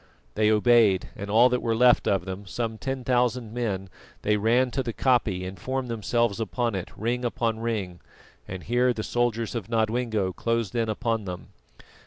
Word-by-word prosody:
They 105 0 +2
obeyed, 110 -3 +4
and 100 -1 -6
all 115 +4 +6
that 125 0 0
were 115 -1 0
left 125 +1 +4
of 95 -3 +1
them, 95 +1 -6
some 110 +3 -3
ten 135 -1 -3
thousand 125 -2 0
men, 105 -6 -2 0.4
they 105 - +2
ran 120 +4 +2
to 135 - -1
the 120 -3 -4
koppie 110 -6 +1
and 95 0 -7
formed 130 +4 -3
themselves 115 0 0
upon 115 +3 -1
it, 95 -2 -4
ring 120 +3 -1
above 115 -2 -1
ring, 105 -6 -3 0.5
and 95 -1 -7
here 125 +2 +2
the 110 - -4
soldiers 115 -2 -1
of 115 -4 -5
Nodwengo 110 -4 0
closed 115 -2 -1
in 115 -2 0
upon 115 -1 -1
them. 90 -1 -7
115 Hz, 180 wpm, -26 LUFS, 100-120 Hz, 0.5 s, all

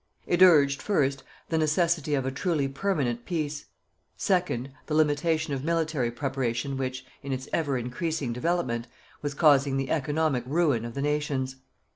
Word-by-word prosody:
It 175 +1 +1
urged, 145 -6 +6
first, 140 -9 +1 0.3
the 160 - +1
necessity 155 -1 +2
of 135 -2 -1
a 130 - -1
truly 145 0 0
permanent 135 -6 -1
peace; 155 -3 -3 0.5
second, 180 - 0 0.2
the 155 - -1
limitation 155 +1 +2
of 135 -1 -3
military 160 -6 0
preparation 130 0 -2
which, 130 -1 -3 0.2
in 140 - -5
its 130 0 -3
ever 145 -5 +1
increasing 125 +2 -2
development, 125 -4 -1 0.3
was 145 -1 -3
causing 140 -3 +4
the 135 0 -2
economic 150 -3 +1
ruin 145 -6 +2
of 120 - -7
the 140 - -2
nations. 145 -3 -1
145 Hz, 150 wpm, -27 LUFS, 130-160 Hz, 0.5 s, urged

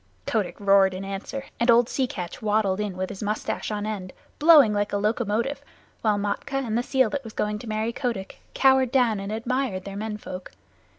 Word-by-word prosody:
Kotick 205 -5 -1
roared 195 -2 +4
in 190 +1 -5
answer, 195 +8 -5
and 235 - +1
old 235 0 +6
Sea 260 0 0
Catch 180 +3 -6
waddled 210 -3 +1
in 205 -3 -3
with 185 0 -2
his 190 - -8
mustache 210 0 -2
on 210 -1 -3
end, 200 -4 -5 0.3
blowing 295 -8 +7
like 205 0 0
a - - +2
locomotive, 225 +5 -1 0.4
while 215 -2 +2
Matkah 230 +7 -2
and 220 -2 -2
the 240 - +2
seal 260 -2 +2
that 280 -1 -3
was 225 -2 -9
going 210 0 -1
to 230 - -8
marry 220 +2 -1
Kotick 230 -7 -4 0.2
cowered 265 -2 +4
down 240 -6 +3
and 195 +1 -5
admired 230 -3 -2
their 200 0 -6
men 210 +1 -4
folk. 185 -3 -8
215 Hz, 200 wpm, -25 LUFS, 200-245 Hz, 0.4 s, blowing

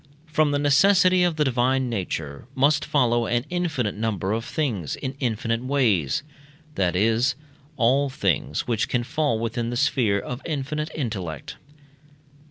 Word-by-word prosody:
From 155 -1 +2
the 145 - +1
necessity 185 +6 +4
of 175 -2 +2
the 155 - +2
divine 130 0 +1
nature 90 - -4
must 145 +3 +3
follow 120 -6 +2
an 120 +1 0
infinite 160 - -1
number 105 -3 -2
of 115 +1 -2
things 115 - -2
in 130 -1 -5
infinite 115 -1 -1
ways 120 - +1 0.5
that 90 -6 0
is, 115 +6 +2 0.4
all 135 +3 +3
things 90 - 0
which 115 -3 0
can 120 -2 0
fall 145 -1 0
within 115 +1 -2
the 120 - -3
sphere 120 -6 +2
of 125 +6 -6
infinite 150 0 -3
intellect. 95 - -4
125 Hz, 145 wpm, -24 LUFS, 110-145 Hz, 0.5 s, necessity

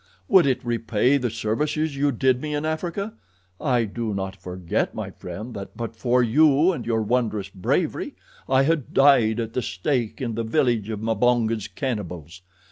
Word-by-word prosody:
Would 185 -6 +6
it 130 -2 0
repay 120 +2 +2
the 125 -3 -1
services 145 +8 -1
you 140 +1 +2
did 130 +1 +2
me 150 -1 -3
in 145 +1 -2
Africa? 175 +6 -3 0.5
I 125 -4 +2
do 110 0 -3
not 95 0 -3
forget, 90 -2 -3
my - - -4
friend, 105 +7 -8
that 100 -2 -8
but 115 -1 -5
for 125 +2 +2
you 150 +7 +4
and 125 -10 -5
your 115 -2 +1
wondrous 110 -3 0
bravery 95 -3 -1 0.3
I 135 0 +4
had 155 -2 0
died 125 -5 +5
at 115 -1 -3
the 125 - 0
stake 115 +4 -2
in 120 -3 -2
the 115 +1 -2
village 115 -3 +1
of 105 -2 -4
Mbonga's 115 -1 +1
cannibals. 90 - -5
120 Hz, 170 wpm, -24 LUFS, 110-135 Hz, 0.5 s, Would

